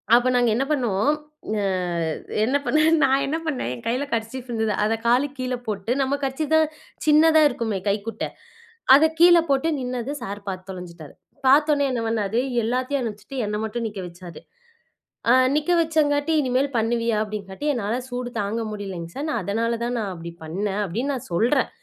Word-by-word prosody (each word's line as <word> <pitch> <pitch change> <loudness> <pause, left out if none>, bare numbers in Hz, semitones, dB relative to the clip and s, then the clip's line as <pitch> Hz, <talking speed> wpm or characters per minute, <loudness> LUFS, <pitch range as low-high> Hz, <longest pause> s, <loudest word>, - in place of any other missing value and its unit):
அப்ப 245 +1 +3
நாங்க 245 -2 +3
என்ன 270 - 0
பண்ணோம் 240 -3 +1 0.5
அ - - -1 0.8
என்ன 270 +4 +2
பண்ணேன் 310 +2 +4
நான் 270 0 +3
என்ன 310 +4 -1
பண்ணேன், 255 - -2
என் 120 - -9
கைல 255 +5 0
கர்ச்சீப் 230 +3 -3
இருந்தது. 220 -2 0
அத 220 - +1
காலுக்கு 270 +3 +2
கீழ 255 0 -1
போட்டு 210 +1 -3
நம்ம 270 +1 0
கர்ச்சீப் 285 +4 -1
தான் 315 -1 +4 0.4
சின்னதா 315 +1 +6
இருக்குமே, 220 -6 -2
கைக்குட்ட. 210 +3 -2 0.7
அத 310 +3 +6
கீழ 345 0 +8
போட்டு 275 +4 +2
நின்னது 250 +1 -3
சார் 200 +1 -5
பாத்து 185 0 -5
தொலைஞ்சுட்டாரு. 170 -5 -9 0.3
பாத்தோனே 290 +1 +5
என்ன 245 -2 -1
பண்ணாரு, 220 0 0 0.2
எல்லாத்தையும் 255 +4 -1
அனுப்புச்சுட்டு 230 +3 -6
என்னை 210 0 -2
மட்டும் 230 +1 -3
நிக்க 205 -2 -7
வச்சாரு. 175 0 -11 0.9
அ 240 - +7 0.2
நிக்க 305 +4 +1
வச்சங்காட்டி, 310 -1 +1
"இனிமேல் 265 +1 +1
பண்ணுவியா?" 230 0 +1
அப்படின்னு 210 -2 -6
காட்டி. 190 +10 -6
"என்னால 225 -1 -1
சூடு 245 0 -4
தாங்க 210 +3 -2
முடியலிங்க 190 -5 -6
சார், 290 +3 -3
நான் 235 -7 -1
அதனால 230 +4 -1
தான் 245 +1 -1
நான் 200 -3 -3
அப்படி 170 -1 -8
பண்ணேன்" 195 +5 -2
அப்படின்னு 235 +11 -2
நான் 250 - -7
சொல்றேன். 245 +9 +2
240 Hz, 170 wpm, -23 LUFS, 205-275 Hz, 0.9 s, கீழ